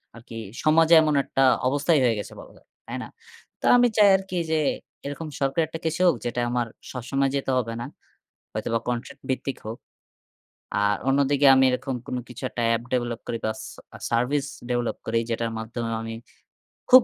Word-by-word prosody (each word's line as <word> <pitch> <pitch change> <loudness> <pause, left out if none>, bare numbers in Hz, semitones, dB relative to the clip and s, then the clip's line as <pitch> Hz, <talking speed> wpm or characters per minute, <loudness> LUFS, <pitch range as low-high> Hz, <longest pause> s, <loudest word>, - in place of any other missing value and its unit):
আরকি, 115 0 -10 0.3
সমাজে 160 +2 +5
এমন 155 -2 +2
একটা 135 - +1 0.2
অবস্থাই 145 +4 +2
হয়ে 115 -3 +3
গেছে - - -7
বলা - - -12
যায়। - - -24 0.2
তাই - - -4
না? - - -7 0.5
তো - - -4
আমি 245 0 +6
চাই 205 -1 +7
আরকি 190 -1 -5
যে 160 - +3 0.5
এরকম 145 +3 -5
সরকারি 140 +4 +1
একটা 160 +1 -7
কিছু 165 +3 -1
হোক, 165 - +4
যেটা 120 0 -2
আমার 120 -1 0 0.2
সবসময় 135 +2 -1
যেতে 135 -1 -1
হবে 115 -2 -1
না। - - -4 0.7
হয়তোবা 115 0 -1
কন্ট্রাক্ট 125 +3 -4
ভিত্তিক 130 +1 -2
হোক। 110 +2 -5 1.1
আর 105 0 +3
অন্যদিকে 140 +1 +3
আমি 130 0 +5
এরকম 130 +1 -2
কোনো 125 - -2
কিছু 125 +2 -10
একটা 120 - -4
এপ 115 - -3
ডেভেলপ 120 -2 -1
করি 115 - -2
বা 110 - +1 0.2
সা - - -14 0.3
সার্ভিস 130 +5 +1 0.2
ডেভেলপ 120 -1 -1
করি 115 +1 +1
যেটার 115 0 -1
মাধ্যমে 115 +1 -4
আমি 115 0 -5 0.7
খুব 255 -1 +10
130 Hz, 175 wpm, -25 LUFS, 115-145 Hz, 1.1 s, খুব